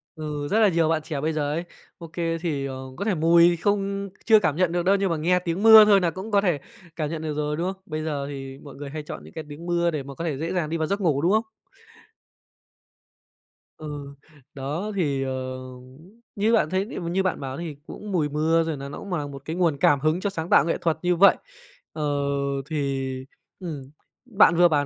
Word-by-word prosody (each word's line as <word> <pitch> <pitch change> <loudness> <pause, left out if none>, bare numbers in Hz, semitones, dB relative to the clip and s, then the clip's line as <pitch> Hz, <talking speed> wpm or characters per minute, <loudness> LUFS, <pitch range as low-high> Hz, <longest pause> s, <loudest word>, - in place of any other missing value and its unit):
Ừ, 150 -2 -4
rất 210 +8 +2
là 220 - +6
nhiều 165 -3 +2
bạn 160 -1 +1
trẻ 150 -3 -4
bây 160 +2 0
giờ 145 -2 -1
ấy, 165 +3 -2 0.3
OK 165 -3 -11 0.3
thì, 150 -6 -2
ờ, 135 -1 -5 0.2
có 200 - -3
thể 210 -3 +1
mùi 170 +2 +5
không 200 +1 -1 0.2
chưa 220 -1 +7
cảm 160 -7 0
nhận 180 0 +2
được 175 0 0
đâu. 195 +2 +5
Nhưng 195 -1 0
mà 165 - 0
nghe 180 +4 +2
tiếng 180 +2 -3
mưa 220 -1 +10
thôi 205 -2 +6
nà 175 -2 +1
cũng 190 +5 -7
có 200 -1 +4
thể 175 -7 +1 0.4
cảm 155 -3 -2
nhận 160 0 -4
được 155 -1 -3
rồi, 150 0 -2
đúng 180 +3 -1
không? 190 - -24
Bây 155 -1 -4
giờ 145 -3 -2
thì 135 -1 -7
mọi 140 -2 -11
người 140 0 -7
hay 155 +2 -6
chọn - - -8
những - - -14
cái 160 - -6
tiếng 150 +4 -9
mưa 175 0 +1
để 150 -4 -3
mà 140 +1 -9
có 165 - -5
thể 150 -5 -2
dễ 165 +5 -3
dàng 170 -5 -1
đi 165 - -1
vào 160 -1 -1
giấc 200 +3 -1
ngủ, 155 -7 +2
đúng 170 +4 +2
không? 220 +2 +2 2.3
Ừ, 145 -2 -7 0.4
đó, 150 +10 -4
thì, 145 -8 0
ờ, 130 -1 -4 0.8
như 215 +3 +2
bạn 220 -9 +3
thấy 190 +2 0
thì - - -5
m 170 -2 -4
như 190 +2 +1
bạn 185 - -1
bảo 135 -1 -5
thì 165 -3 -5
cũng 210 0 -8
mùi 160 -6 +1
mưa, 160 +3 +2
rồi 160 -2 -3
nà 140 0 -7
nó 145 - -7
cũng 200 - -9
mà 155 -6 -2
một 140 -1 -9
cái 160 - -4
nguồn 170 -5 +1
cảm 140 0 +4
hứng 155 +4 +1
cho 200 - -1
sáng 165 -3 -5
tạo - - +5
nghệ 165 - 0
thuật 165 -2 +1
như 180 0 +2
vậy. 200 +4 +6 0.6
Ờ, 155 - -4 0.7
thì, 140 -3 -1 0.5
ừm, 165 -7 -5 0.4
bạn 210 -8 +4
vừa 175 +1 +6
bảo 145 -3 +1
165 Hz, 240 wpm, -24 LUFS, 145-185 Hz, 2.3 s, mưa